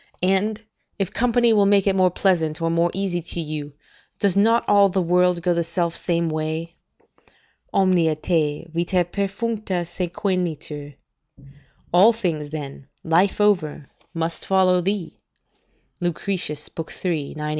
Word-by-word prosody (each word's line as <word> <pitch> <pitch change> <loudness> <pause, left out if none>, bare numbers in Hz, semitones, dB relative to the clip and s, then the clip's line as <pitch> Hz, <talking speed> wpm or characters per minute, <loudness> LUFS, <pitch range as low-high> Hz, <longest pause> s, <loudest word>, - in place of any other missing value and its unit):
And, 195 +3 +1 0.4
if 195 -3 -2
company 240 -1 +3
will 205 -2 +4
make 200 -1 +4
it 195 -1 +2
more 185 -1 +4
pleasant 170 -4 +1
or 165 0 0
more 170 +1 +2
easy 190 -2 -2
to 170 +1 -5
you, 150 -2 -4 0.5
does 200 -3 +2
not 225 +4 +3
all 200 -1 +5
the 190 +1 0
world 180 0 +2
go 175 -1 +2
the 170 0 0
self 170 0 -2
same 170 -1 -1
way? 160 +1 -3 1.0
"'Omnia 180 -5 +3
te, 155 -1 -1
vita 175 +1 +1
perfuncta, 200 0 -2
sequentur.' 170 -5 -3 1.0
["All 200 +7 +7
things, 165 -9 -2
then, 140 -3 -7 0.2
life 175 +6 +2
over, 180 -9 +1 0.3
must 165 -1 -3
follow 185 -1 +3
thee." 195 -2 -3 0.8
Lucretius, 175 -3 -2 0.4
iii. 155 -6 -2
175 Hz, 130 wpm, -22 LUFS, 165-195 Hz, 1.0 s, All